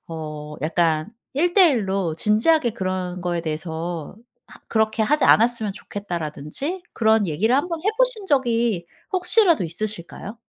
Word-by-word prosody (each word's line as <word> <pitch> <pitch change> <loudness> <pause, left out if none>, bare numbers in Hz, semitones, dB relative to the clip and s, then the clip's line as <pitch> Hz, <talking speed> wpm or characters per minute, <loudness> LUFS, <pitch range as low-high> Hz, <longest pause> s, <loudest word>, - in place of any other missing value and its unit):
어 150 -2 -7
약간 160 +3 0 0.2
일대일로 255 - +3
진지하게 235 - +3
그런 185 -3 -4
거에 175 -1 -1
대해서 160 +1 -5 0.3
하 - - -16
"그렇게 220 0 +1
하지 295 +7 +2
않았으면 225 -2 +3
좋겠다."라든지 195 - -5
그런 220 -2 +2
얘기를 190 +10 +1
한번 335 +3 -2
해보신 440 +1 +1
적이 235 - +1 0.3
혹시라도 360 - +4
있으실까요? 205 +4 -6
210 Hz, 315 characters per minute, -22 LUFS, 170-275 Hz, 0.3 s, 혹시라도